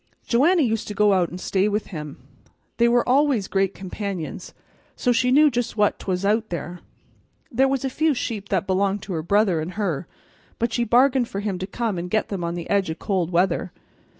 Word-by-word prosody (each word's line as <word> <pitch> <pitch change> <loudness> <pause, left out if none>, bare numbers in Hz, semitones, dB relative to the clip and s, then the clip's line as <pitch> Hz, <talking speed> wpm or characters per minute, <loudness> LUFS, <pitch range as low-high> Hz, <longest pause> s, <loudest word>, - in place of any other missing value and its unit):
Joanna 310 +8 +3
used 225 -3 -1
to 210 - -5
go 210 0 +4
out 180 -3 +2
and 180 - -8
stay 195 +2 +1
with 210 +1 -1
him. 150 -3 -6 0.6
They 235 - +4
were 240 0 +2
always 260 -6 +2
great 195 0 0
companions, 190 -3 -5 0.4
so 245 - +1
she 245 +1 +2
knew 295 +3 +5
just 240 -1 -2
what 205 -1 +2
'twas 185 0 -2
out 220 +2 +1
there. 175 0 -5 0.7
There 265 +3 +3
was 270 0 -1
a - - 0
few 310 +1 +1
sheep 210 -5 -4
that 190 -2 0
belonged 195 +1 0
to 195 - -5
her 160 - -2
brother 190 -1 +2
an' 160 - -4
her, 175 -7 -2 0.5
but 235 0 -1
she 240 - +1
bargained 250 +1 +3
for 200 - -5
him 200 -3 -3
to 190 - -4
come 215 -3 -2
and 175 +1 -5
get 215 +3 0
them 195 -4 -4
on 170 0 -2
the 170 -1 -6
edge 200 -3 +1
o' 160 - -3
cold 185 -3 -1
weather. 180 0 +1
200 Hz, 210 wpm, -23 LUFS, 185-235 Hz, 0.7 s, knew